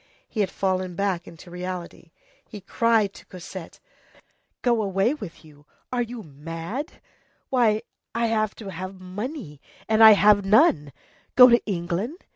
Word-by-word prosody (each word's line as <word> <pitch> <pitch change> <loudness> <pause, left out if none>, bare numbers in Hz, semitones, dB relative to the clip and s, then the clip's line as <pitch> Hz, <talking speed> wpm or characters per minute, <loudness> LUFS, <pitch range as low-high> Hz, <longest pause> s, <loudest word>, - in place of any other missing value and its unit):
He 220 - -7
had 200 -3 +2
fallen 185 -2 -2
back 190 -2 -1
into 170 +1 -13
reality. 180 -1 -7 0.4
He 210 - -8
cried 215 +1 +1
to - - -15
Cosette:— 180 -1 -10 0.8
"Go 235 -3 +2
away 195 +4 +1
with 205 - -10
you! 150 -1 -19 0.3
Are 245 - +1
you 235 -1 -5
mad? 165 - -6 0.6
Why, 225 -4 +2 0.3
I 230 0 +1
should - - 0
have 215 -1 0
to 200 -4 -8
have 185 +2 -7
money, 185 - -7 0.3
and 220 0 +4
I 220 -1 +11
have 205 0 +5
none! 195 - +4 0.4
Go 250 0 +9
to 235 0 +4
England? 195 - -3
200 Hz, 150 wpm, -24 LUFS, 175-225 Hz, 0.8 s, I